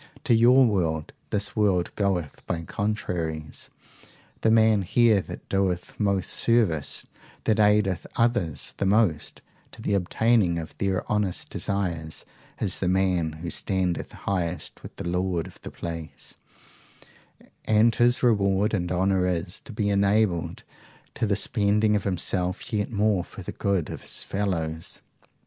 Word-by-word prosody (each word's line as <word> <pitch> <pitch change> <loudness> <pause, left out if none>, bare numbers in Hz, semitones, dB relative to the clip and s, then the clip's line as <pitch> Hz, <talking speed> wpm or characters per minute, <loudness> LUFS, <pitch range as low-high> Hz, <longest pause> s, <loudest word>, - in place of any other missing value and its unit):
To - - +3
your 125 +3 +6
world, 80 -8 0 0.2
this 105 0 -1
world 95 -5 +1
goeth 95 -7 -1
by 85 -1 -2
contraries. 85 -7 -3 0.7
The 110 - +3
man 110 -2 +5
here 110 +2 +4
that - - -9
doeth 95 -3 -1
most 100 -3 0
service, 105 -11 +1 0.4
that 110 0 +2
aideth 105 -3 +3
others 115 -10 0
the 100 - 0
most 100 -7 +1 0.3
to - - -13
the 105 - -1
obtaining 100 -1 +2
of 80 -2 -6
their 95 -1 0
honest 105 -4 -1
desires, 85 -6 -2 0.3
is 95 -4 0
the 95 - 0
man 90 -3 +1
who 85 - -3
standeth 95 -3 -1
highest 90 -3 -3
with - - -11
the - - -5
Lord 90 -1 0
of 95 - -13
the - - -7
place, 80 -2 -7 1.3
and 110 +2 +4
his 120 +3 +3
reward 100 -3 +3
and 90 -4 -1
honour 95 0 +2
is, 90 -1 -2
to - - -8
be 105 -2 0
enabled 100 -3 +1 0.5
to 115 - -1
the 100 - +2
spending 105 +1 +2
of 100 - -1
himself 90 +3 -1
yet 105 -1 0
more 105 -4 +1
for - - -10
the - - -5
good 100 -5 -1
of - - -7
his - - -3
fellows. 80 -5 -3
95 Hz, 145 wpm, -26 LUFS, 90-105 Hz, 1.3 s, your